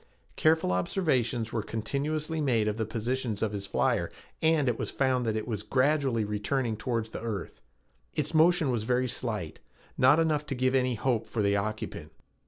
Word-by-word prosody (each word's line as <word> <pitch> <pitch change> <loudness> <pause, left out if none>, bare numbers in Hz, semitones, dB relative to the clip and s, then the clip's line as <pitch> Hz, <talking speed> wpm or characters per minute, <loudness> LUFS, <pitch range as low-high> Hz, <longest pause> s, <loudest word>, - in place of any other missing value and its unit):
Careful 160 - +3
observations 120 - 0
were 115 - 0
continuously 150 +9 -2
made 115 -7 +2
of 105 0 -1
the 110 -2 -1
position 120 +1 -2
of 110 - 0
his 100 -1 -4
flyer - - +1 0.3
and 160 -3 +3
it 120 -2 0
was - - -2
found 130 -3 +1
that 110 - 0
it 110 - -3
was 110 -4 -2
gradually 130 0 +1
returning 110 +3 -1
toward 115 +1 -2
the - - -6
earth. 105 -11 -5 0.5
Its 150 +1 -1
motion 160 -2 +4
was 115 -3 -1
very 125 +2 +1
slight, 105 -10 -3 0.4
not 130 +5 +6
enough 155 -2 +1
to 135 - -2
give 130 +1 +1
any 130 -2 +2
hope 115 0 0
for 110 - -1
the 100 0 +2
occupant. 110 +2 -4
125 Hz, 180 wpm, -29 LUFS, 110-140 Hz, 0.5 s, not